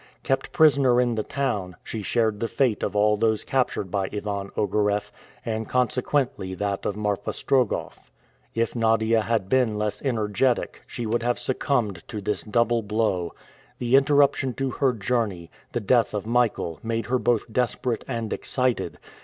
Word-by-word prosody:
Kept 135 0 -1
prisoner 140 -6 +5
in 120 -1 +2
the 110 - -1
town, 105 -8 -2
she 110 - -5
shared 110 0 0
the 115 - -1
fate 115 -1 +1
of - - -2
all 105 +1 +3
those 110 0 +1
captured 125 -8 -1
by 95 -2 -1
Ivan 100 -1 -3
Ogareff, 105 0 0 0.3
and 110 -1 -3
consequently 125 -5 0
that 100 +1 -2
of 105 - -3
Marfa 105 -1 -1
Strogoff. 130 -2 -1 0.5
If 115 +1 0
Nadia 115 -1 +3
had 110 -3 0
been 120 -2 +2
less 105 -1 -2
energetic, 120 -1 0
she 120 - -5
would 115 +2 0
have 120 +1 0
succumbed 120 - -1
to 105 - -5
this 105 +1 -2
double 115 +1 +1
blow. 105 -5 -1 0.4
The 125 +1 +2
interruption 140 -2 +3
to 135 -1 -1
her 130 0 +1
journey, 105 -6 -2 0.2
the - - -1
death 115 +1 +2
of 105 - -3
Michael, 115 -9 0
made 115 0 -2
her 125 +1 +1
both 115 -2 0
desperate 125 -1 0
and 115 -4 -3
excited. 125 -2 -1
115 Hz, 160 wpm, -25 LUFS, 105-125 Hz, 0.5 s, prisoner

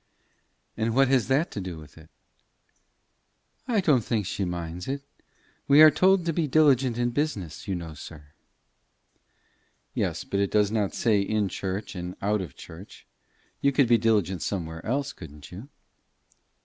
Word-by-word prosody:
"But 110 +1 -1
what 135 +1 +4
has 130 -5 +2
that 140 +6 +1
to 100 - -5
do 90 -3 -6
with 75 -1 -14
it?" 80 0 -16 1.6
"I 225 -5 +2
don't 140 - +3
think 105 -2 -1
she 95 +2 -2
minds 85 0 -5
it. 140 +1 -3 0.6
We 140 +1 +6
are 155 - +9
told 185 +3 +3
to 165 - 0
be 160 -1 0
diligent 135 -5 +3
in 120 0 0
business, 115 - -3
you 95 - -1
know, 85 -2 -6
sir." 75 0 -12 1.6
"Yes, - - -2
but 100 - -3
it 100 -1 +1
does 105 -1 +2
not 105 -3 -1
say 105 -4 +2
in 105 0 0
church 95 +3 -4
and 90 -1 -6
out 105 +1 0
of 80 -8 -8
church. 85 +5 -12 0.6
You 140 - +3
could 140 -2 +3
be 115 -1 +4
diligent 100 -6 +1
somewhere 80 -4 -4
else, 140 +4 -2
couldn't 75 -4 -12
you?" 105 +10 -10
105 Hz, 160 wpm, -26 LUFS, 90-135 Hz, 1.6 s, are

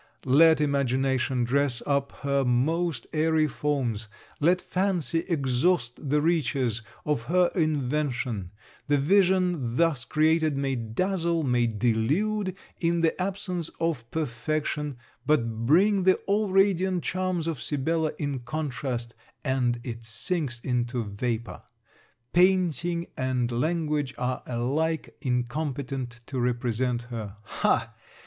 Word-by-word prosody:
Let 155 +4 +6
imagination 135 -3 +1
dress 130 0 +1
up 140 -1 0
her 140 -1 +2
most 140 +3 +1
airy 160 0 +3
forms, 125 -7 -1 0.3
let 175 +4 +4
fancy 180 -4 0
exhaust 135 -2 0
the 150 +1 +2
riches 135 -8 +1 0.2
of 145 -6 0
her 180 +4 +3
invention, 140 - -1 0.4
the 145 0 +3
vision 180 +2 +3 0.2
thus 160 -5 +2
created 155 0 +2
may 135 -1 0
dazzle, 165 - -1
may 125 -3 +2
delude 145 - 0 0.2
in 170 0 +1
the 165 +2 +1
absence 185 -3 -2
of 150 -9 -1
perfection; 150 0 -2 0.3
but 115 -6 0
bring 195 +7 +5
the 185 0 +5
all 205 +1 +1
radiant 190 -2 +2
charms 185 -2 -1
of 165 -5 -3
Sibella 155 +2 0
in 145 -3 -2
contrast, 125 -4 -4 0.3
and 125 -3 +1
it 115 -2 -6
sinks 120 +3 -3
into 120 -1 -1
vapour. 110 +3 -3 0.7
Painting 175 -2 +2
and 130 -2 0
language 150 +1 -1
are 125 0 -2
alike 145 +7 -1
incompetent 130 -1 -2
to 130 0 -4
represent 120 0 0
her. 110 -3 -5
Ha! - - 0
145 Hz, 115 wpm, -27 LUFS, 125-165 Hz, 0.7 s, Let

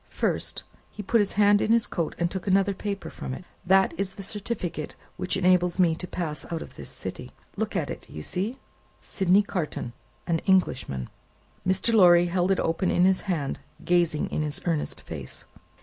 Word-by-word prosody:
First," - - -1 0.3
he 210 - -8
put 225 +3 +3
his 200 - 0
hand 205 0 +5
in 220 - +1
his 230 -1 +4
coat, 170 -3 -3
and 170 0 0
took 190 +1 -5
another 195 +1 +3
paper 200 0 -4
from 130 - -5
it, 180 - -10 0.2
"that 190 +1 +4
is 195 -1 -1
the 195 - -8
certificate 195 -6 -4 0.2
which 185 +2 -1
enables 180 -1 +3
me 175 -3 +4
to 180 +3 -6
pass 160 -5 -4
out 165 -1 -2
of - - -14
this - - -7
city. - - -7 0.2
Look - - -2
at - - -1
it. - - -9
You 75 - -7
see 205 - -2 0.4
Sydney 190 +1 +3
Carton, 155 -11 -3 0.3
an 165 -2 +1
Englishman?" 130 - +1 0.6
Mr. 190 +5 +2
Lorry 175 -4 +7
held 175 +1 +1
it 195 - +2
open 165 +3 0
in 175 - +4
his 190 0 +3
hand, 160 -9 -2 0.3
gazing 170 -3 +2
in - - -1
his 150 0 -2
earnest 165 -4 -1
face. - - -7
185 Hz, 185 wpm, -26 LUFS, 170-195 Hz, 0.6 s, Lorry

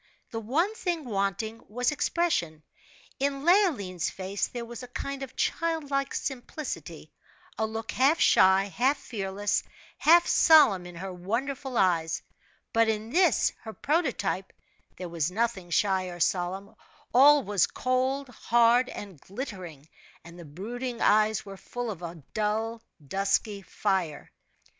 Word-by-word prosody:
The 225 - -3
one 305 - 0
thing 345 -8 -3
wanting 215 +1 -2
was 245 +5 0
expression 275 - -1 0.6
in 275 +1 -1
Leoline's 265 - +2
face 195 +1 -3
there 240 -1 -6
was 235 +1 -8
a 250 - -8
kind 275 +2 -5
of 265 -1 -7
childlike 285 -5 -1
simplicity; 270 +2 -6 0.4
a 220 - -1
look 225 0 -5
half 275 +6 +3
shy, 190 +1 +5
half 245 - +1
fearless, 205 -3 -2 0.4
half 340 +2 +6
solemn 230 - +5
in 175 - -11
her 185 +2 -6
wonderful 250 +8 -3
eyes; 165 -3 +1 0.5
but 230 0 +4
in 220 +1 -2
this, 345 -2 +3
her 220 - -8
prototype, 260 - -1 0.5
there 180 - -5
was 165 -1 -1
nothing 200 -3 -2
shy 190 +1 +1
or 175 -1 -8
solemn; 185 +3 -1 0.4
all 285 +3 +7
was 200 -3 +2
cold, 260 +2 -1
hard, 240 +1 +3
and 190 -8 -9
glittering, 185 - -8 0.4
and 170 +1 -13
the 170 - -10
brooding 235 - -6
eyes 215 0 +3
were 195 -1 -9
full 245 +3 -5
of 180 -4 -8
a 170 -3 -8
dull, 220 +2 -1 0.3
dusky 195 +4 0
fire. 185 -4 -2
220 Hz, 135 wpm, -28 LUFS, 190-265 Hz, 0.6 s, all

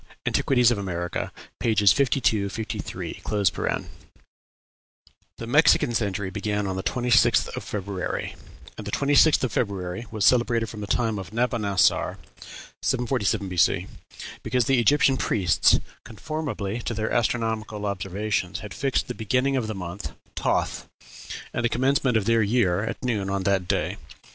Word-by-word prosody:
("Antiquities 125 -3 +3
of 115 - 0
America," 90 -3 -3 0.3
pp. 105 -4 +4
52, 120 -7 +1
53.) 110 +2 -5 2.2
The 115 - -6
Mexican 125 -1 +4
century 100 -3 -1
began 105 +1 -2
on 95 -1 -2
the 95 - -2
26th 125 +3 +3
of - - -5
February, 100 -2 -4 0.4
and 105 - -7
the - - -4
26th 145 +4 +4
of 130 - 0
February 100 0 -2
was 110 -2 -1
celebrated 120 -2 +3
from 105 - -8
the 105 - -5
time 110 -2 0
of 95 -3 -8
Nabonassor, 110 -4 +1 0.6
747 120 -5 0
B.C., 90 -3 +2 0.6
because 125 -2 0
the 135 0 +3
Egyptian 135 +3 +4
priests, 95 -8 +3 0.2
conformably 120 -3 -4
to 120 0 -4
their 110 +1 -2
astronomical 110 -2 -1
observations, 100 0 -2
had 105 -2 -8
fixed 135 -2 -1
the 125 - -4
beginning 125 +5 0
of 125 -4 -1
the 110 - -4
month 90 +1 -6 0.2
Toth, - - -1 0.6
and 120 - -2
the 115 - +2
commencement 130 -1 +2
of 105 - -1
their 115 0 +3
year, 100 -4 +2
at 115 +3 -5
noon 105 -6 -1
on 100 -1 -1
that 95 -2 +1
day. - - -1
110 Hz, 140 wpm, -25 LUFS, 100-120 Hz, 2.2 s, pp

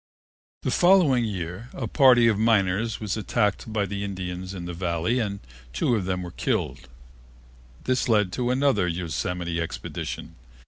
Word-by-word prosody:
The - - 0
following 175 -10 +4
year 95 +2 -5
a 125 - -4
party 125 0 +6
of 110 -3 +2
miners 110 0 +2
was 105 -3 -2
attacked 110 0 -1
by 105 -2 0
the 100 +1 -4
Indians 95 -2 -5
in 90 -2 -6
the 85 - -5
Valley 85 +7 0
and 100 -3 -3 0.3
two 90 - +1
of 100 -5 -1
them 90 -1 -2
were 90 - -7
killed. 70 - -2 0.9
This 130 -1 0
led 105 -4 +3
to 125 -1 -1
another 130 -7 +2
Yosemite 85 +1 -2
expedition. 80 - -6
100 Hz, 150 wpm, -25 LUFS, 90-115 Hz, 0.9 s, party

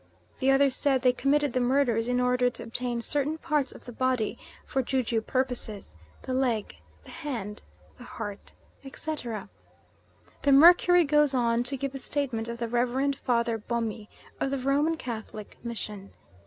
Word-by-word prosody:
The 265 - +2
others 270 -1 +4
said 270 -3 +1
they 250 -1 +5
committed 280 +1 +1
the 255 - +1
murders 245 -3 +2
in 245 0 +1
order 250 0 +3
to 235 -1 -9
obtain 235 0 -3
certain 290 +5 0
parts 300 -5 0
of - - -14
the 245 - -7
body 255 -2 0 0.3
for 270 - 0
ju 260 +1 0
ju 225 -1 0
purposes, 245 - -3 0.3
the 260 - -3
leg, 245 -5 0 0.3
the - - -13
hand, 240 -11 -5 0.4
the - - -10
heart, 205 -4 -7 0.3
etc. 270 -6 -5 0.9
The 280 - +4
Mercury 350 +4 +7
goes 295 -2 +3
on 235 -1 +2
to 275 +2 -2
give 275 0 -3
the 270 - -6
statement 255 -6 -2
of 235 0 -5
the 235 0 -2
Reverend 250 +4 +1
Father 235 -3 0
Bomy 225 -1 -3 0.3
of - - 0
the 275 - -1
Roman 285 +5 +1
Catholic 220 -5 -7
Mission. 210 -4 -6
250 Hz, 165 wpm, -28 LUFS, 235-275 Hz, 0.9 s, Mercury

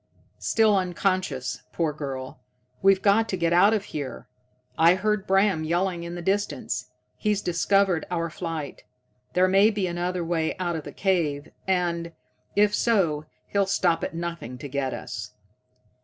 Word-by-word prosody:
"Still 220 -2 +3
unconscious, 185 -7 -1
poor 160 -3 0
girl. 135 -3 -6 0.4
We've 195 0 +4
got 220 +2 +4
to 190 - -1
get 170 -1 +1
out 190 +4 +6
of 215 -3 +1
here. 145 -3 -5 0.5
I 165 +2 +6
heard 210 +1 0
Bram 195 -4 +3
yelling 175 +2 0
in 170 +1 -6
the 175 - -6
distance. 200 +3 -1 0.3
He's 210 -2 +1
discovered 185 -1 +2
our 170 -2 -2
flight. 165 -4 -5 0.5
There 185 +1 +4
may 195 +3 +5
be 205 -3 -1
another 175 0 -2
way 165 -1 -1
out 175 -2 -1
of 155 - -5
the - - -7
cave, 160 -7 0 0.2
and, 170 -2 0 0.4
if 210 0 +4
so, 170 -12 +2 0.2
he'll 200 -1 +1
stop 175 -4 +2
at - - -3
nothing 170 -8 -5
to 145 - -7
get 135 -1 -2
us. - - -6
175 Hz, 155 wpm, -25 LUFS, 165-195 Hz, 0.5 s, out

